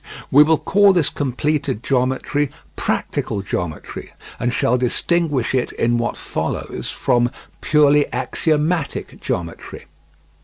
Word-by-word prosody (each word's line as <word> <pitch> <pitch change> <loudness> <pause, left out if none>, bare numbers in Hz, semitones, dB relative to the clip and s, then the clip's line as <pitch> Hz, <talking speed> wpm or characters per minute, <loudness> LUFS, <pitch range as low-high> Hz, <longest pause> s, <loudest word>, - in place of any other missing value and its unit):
We 145 - +8
will 155 +1 +5
call 200 +3 +4
this 175 -6 +2
completed 140 -2 -1
geometry 130 +2 0 0.3
"practical 100 - -2
geometry," 90 -5 -5 0.3
and 120 +1 0
shall 120 0 +2
distinguish 135 +2 0
it 130 -2 0
in 120 +1 +1
what 120 - -2
follows - - -4
from 120 -1 +1 0.3
"purely 150 -1 +4
axiomatic 155 0 -1
geometry." 85 -2 -5
135 Hz, 110 wpm, -20 LUFS, 120-150 Hz, 0.3 s, We